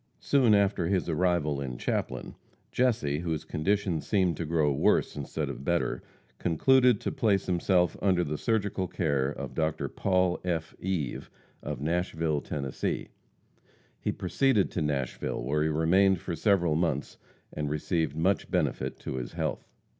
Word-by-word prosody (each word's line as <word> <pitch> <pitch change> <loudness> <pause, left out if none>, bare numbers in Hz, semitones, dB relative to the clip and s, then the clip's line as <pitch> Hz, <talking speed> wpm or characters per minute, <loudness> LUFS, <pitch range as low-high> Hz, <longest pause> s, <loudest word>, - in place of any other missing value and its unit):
Soon 125 -7 +4
after 100 -4 +2
his 95 0 0
arrival 80 -4 +1
in 65 -3 -4
Chaplin, - - -3 0.4
Jesse, 105 - +1
whose 80 -2 -3
condition 90 +1 0
seemed 95 -3 +1
to 85 - -3
grow 80 -2 +2
worse - - +2
instead 70 -2 -3
of - - -6
better, 85 +2 0 0.4
concluded 125 - +4
to - - -2
place 110 -9 +1
himself 90 0 +2
under 90 -3 +3
the 75 -2 -3
surgical 100 -5 0
care 70 -5 0
of 75 - -6
Dr. 80 -1 -1
Paul 90 -2 +1
F. 80 -3 -2
Eve, 90 -8 -3 0.3
of - - -5
Nashville, 80 -2 0
Tenn. 70 -3 -4 1.3
He - - -1
proceeded 135 -8 +1
to 90 - -2
Nashville, 70 -6 -2
where 75 +5 0
he 80 - +2
remained 90 +5 +3
for 85 0 -4
several 85 -1 +2
months, 80 -4 -1 0.3
and 75 -1 -2
received 80 +1 -1
much 90 +5 +1
benefit - - -1
to 65 - -4
his - - -5
health. - - -3
85 Hz, 145 wpm, -28 LUFS, 75-95 Hz, 1.3 s, Soon